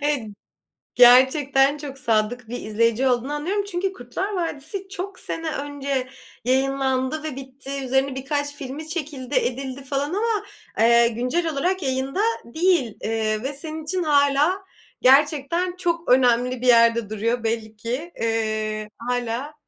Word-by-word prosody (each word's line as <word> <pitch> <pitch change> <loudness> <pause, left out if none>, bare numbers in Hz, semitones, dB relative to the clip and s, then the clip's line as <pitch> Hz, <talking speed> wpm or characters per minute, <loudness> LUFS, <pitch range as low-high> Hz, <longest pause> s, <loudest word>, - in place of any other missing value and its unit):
Evet. 290 -3 +1 0.7
Gerçekten 270 +3 +6
çok 285 -2 -8
sadık 225 0 0
bir 245 - -5
izleyici 230 +4 +1
olduğunu 255 +3 0
anlıyorum 365 +8 -1
çünkü 375 +2 -1
Kurtlar 360 - -4
Vadisi, 350 +2 -4
çok 385 0 -6
sene 325 -1 -4
önce 280 -3 -3 0.4
yayınlandı 265 +2 0
ve 310 -4 -4
bitti, 275 +1 -7
üzerine 265 +1 +1
birkaç 285 +2 -2
filmi 285 +3 -7
çekildi 290 -5 -5
edildi 260 +1 -1
falan 275 +2 -2
ama, 425 0 0 0.4
ııı, 235 +1 +6
güncel 250 +9 -1
olarak 360 +6 0
yayında 265 +6 -1 0.2
değil, 315 - +1
ııı, 220 0 -1
ve 270 +2 -3
senin 310 +2 -7
için 360 +3 -2
hâlâ, 295 +5 +3 0.4
gerçekten 295 +6 +3
çok 340 -4 -1
önemli 250 0 +3
bir 255 - -1
yerde 230 -2 +5
duruyor 230 +3 -1
belli 220 -1 -2
ki. 250 +10 -4
Iıı, 215 -1 -1
hâlâ, 245 +3 -3
270 Hz, 135 wpm, -23 LUFS, 245-305 Hz, 0.7 s, Gerçekten